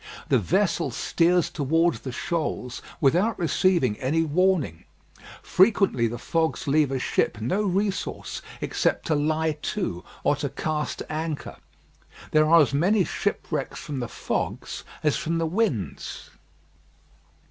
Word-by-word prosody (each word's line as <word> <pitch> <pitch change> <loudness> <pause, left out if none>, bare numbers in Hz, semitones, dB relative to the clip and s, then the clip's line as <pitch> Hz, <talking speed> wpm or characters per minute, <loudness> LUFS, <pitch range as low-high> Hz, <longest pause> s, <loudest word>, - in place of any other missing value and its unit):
The - - +4
vessel - - +1
steers 175 0 +2
towards 160 -1 +1
the 130 - -6
shoals 125 -3 -3 0.2
without 180 +11 +3
receiving 170 - +2
any 155 +5 +1
warning. 160 - +1 0.6
Frequently 190 - +3
the 120 +2 -4
fogs 160 +6 -1
leave 145 0 +3
a 135 - 0
ship 120 -3 0
no 125 - 0
resource 200 0 -2 0.2
except - - 0
to 155 - +1
lie 155 +1 0
to, 95 - -3 0.2
or 145 - +3
to 145 -1 -2
cast 150 +2 -3
anchor. 155 -1 -4 0.7
There 155 0 +4
are 165 0 +8
as 140 - -2
many 185 +8 +3
shipwrecks - - -2
from 145 -3 -5
the 120 -2 -4
fogs - - -3 0.2
as 150 -1 +2
from 165 +1 -1
the 165 - 0
winds. 160 - -2
155 Hz, 130 wpm, -25 LUFS, 135-175 Hz, 0.7 s, are